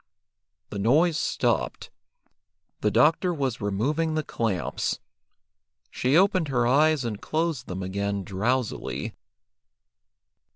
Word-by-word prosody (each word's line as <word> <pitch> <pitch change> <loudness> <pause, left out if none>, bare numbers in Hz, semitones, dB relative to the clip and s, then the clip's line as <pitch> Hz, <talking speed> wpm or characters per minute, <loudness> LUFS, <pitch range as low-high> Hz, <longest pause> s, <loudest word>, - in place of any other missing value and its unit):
The 100 - -4
noise 150 - +3
stopped. - - -1 0.9
The 105 - +2
doctor 155 - +3
was 135 -8 -2
removing 145 +11 0
the 155 - 0
clamps. 105 - -2 0.9
She 130 +5 +2
opened 185 -3 +3
her 125 -4 +1
eyes 145 +2 +3
and 110 -3 -4
closed 160 -5 -1
them 95 +1 -4
again 100 +1 -2
drowsily. 110 +6 -2
125 Hz, 100 wpm, -26 LUFS, 105-155 Hz, 0.9 s, noise